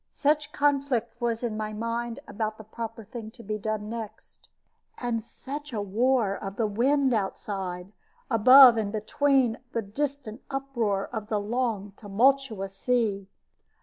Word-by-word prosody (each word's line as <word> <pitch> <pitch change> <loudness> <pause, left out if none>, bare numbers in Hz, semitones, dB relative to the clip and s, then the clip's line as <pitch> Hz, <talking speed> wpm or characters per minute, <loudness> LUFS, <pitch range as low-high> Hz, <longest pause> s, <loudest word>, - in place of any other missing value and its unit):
Such 295 0 +1
conflict 275 -6 0
was 235 0 -1
in 230 -3 -1
my 215 0 -3
mind 230 +3 -3
about 215 0 -3
the 220 - -10
proper 225 +1 -7
thing 220 0 -8
to 235 - -11
be 215 0 -3
done 215 0 -3
next, 225 -1 -8 0.5
and 235 -2 -2
such 285 +5 -8
a 215 - -1
war 215 +1 +1
of 195 -1 -6
the 225 - 0
wind 260 +5 +2
outside, 190 -3 -3 0.4
above 250 +1 +8
and 210 -2 -1
between 245 +3 +1
the 230 - -1
distant 260 +1 -4
uproar 240 -8 -1
of 215 -2 -4
the 215 -1 0
long 210 -2 -2
tumultuous 220 -2 +1
sea. 210 -3 0
225 Hz, 145 wpm, -27 LUFS, 210-255 Hz, 0.5 s, above